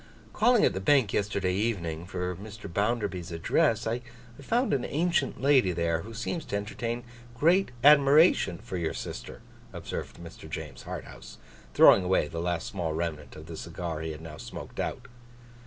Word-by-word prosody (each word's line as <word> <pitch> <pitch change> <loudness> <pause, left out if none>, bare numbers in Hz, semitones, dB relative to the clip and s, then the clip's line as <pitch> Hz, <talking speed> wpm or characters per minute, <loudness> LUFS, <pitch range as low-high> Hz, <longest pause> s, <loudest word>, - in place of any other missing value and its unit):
'Calling 235 0 +4
at - - +2
the 95 - -3
Bank 120 +1 +3
yesterday 100 -3 0
evening, 90 -6 -2
for 90 0 -3
Mr. 105 +2 -9
Bounderby's 100 -3 -1
address, 115 - +1
I 115 +2 -1 0.4
found 240 - +1
an 135 - +1
ancient 160 -3 0
lady 130 -9 +4
there, 85 -1 0
who 110 - -9
seems 150 +8 -3
to - - -4
entertain 115 +3 -3 0.3
great 175 +8 +3
admiration 145 - +6
for 95 - -6
your 85 -2 -2
sister,' - - -7 0.3
observed - - -6
Mr. 85 -2 -11
James 75 -4 -7
Harthouse, - - -8 0.4
throwing 95 - +8
away 90 -4 +2
the 80 +2 -5
last 85 -1 -1
small 85 -5 -3
remnant 80 -2 -4
of 75 - -10
the 80 0 -8
cigar 85 -1 -5
he 80 - -4
had 75 0 -8
now 80 -1 -9
smoked - - -9
out. - - -3
95 Hz, 165 wpm, -28 LUFS, 85-125 Hz, 0.4 s, throwing